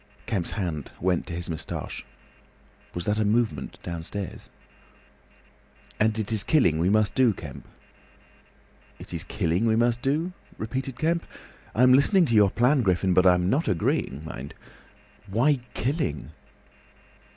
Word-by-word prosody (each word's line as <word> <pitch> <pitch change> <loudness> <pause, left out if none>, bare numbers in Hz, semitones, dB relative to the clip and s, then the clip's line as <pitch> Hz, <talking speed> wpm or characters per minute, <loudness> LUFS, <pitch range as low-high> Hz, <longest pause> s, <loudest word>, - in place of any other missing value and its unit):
Kemp's 95 -6 -1
hand 85 -9 -3
went 90 0 0
to - - -6
his 85 0 -2
moustache. 80 -2 -5 0.9
Was 85 - -3
that 105 +1 0
a - - +3
movement 105 - 0
downstairs? 90 +3 -6 1.5
"And 110 +1 +2
it 110 0 -2
is 110 -3 +2
killing 100 - +3
we 85 +3 +2
must 105 0 +3
do, 125 -4 +4
Kemp." 70 -7 -10 1.3
"It - - -9
is - - -3
killing 85 +8 0
we 110 - +3
must 120 +1 +2
do," 155 +7 0 0.2
repeated 130 +3 -4
Kemp. 165 +1 0 0.5
"I'm 125 +3 +6
listening 170 +7 +5
to 120 - -1
your 105 -2 +6
plan, 125 +7 +3
Griffin, 95 -3 +2
but 90 +1 +5
I'm 90 0 +4
not 140 - +1
agreeing, 75 -4 0
mind. 70 -3 -8 0.7
Why 125 +8 +2 0.2
killing?" 125 - -2
105 Hz, 140 wpm, -26 LUFS, 90-125 Hz, 1.5 s, I'm